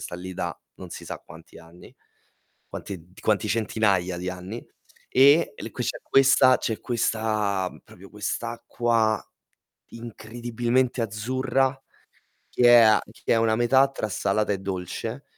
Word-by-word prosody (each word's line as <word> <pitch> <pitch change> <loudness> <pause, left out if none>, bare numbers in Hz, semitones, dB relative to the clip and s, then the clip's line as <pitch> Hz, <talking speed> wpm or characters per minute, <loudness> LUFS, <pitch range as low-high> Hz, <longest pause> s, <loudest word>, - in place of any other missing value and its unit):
sta - - -7
lì 90 +1 -7
da 85 -1 -4 0.2
non - - -10
si - - -8
sa - - -6
quanti 80 0 -15
anni, 85 +1 -16 0.7
quanti 100 -2 -7
d - - -16
quanti 110 0 +1
centinaia 100 -5 0
di 90 +1 -5
anni. 95 +6 -8 0.4
E 140 +5 +5
l - - -7
qui - - -4
c'è - - -3
questa 135 -1 +5
c'è 110 - -3
questa 110 -5 -1
proprio 95 +1 -15
quest'acqua 115 +1 -1 0.7
incredibilmente 120 +2 -2
azzurra 130 +5 -1 0.7
che 125 - 0
è 120 -1 +9
a 110 -1 +6
che - - -22
è 115 - +3
una 115 -1 +2
metà 130 +3 +4
tra 120 -5 -4
salata 100 +2 0
e 100 - -2
dolce. 95 -2 -5
110 Hz, 140 wpm, -25 LUFS, 100-120 Hz, 0.7 s, è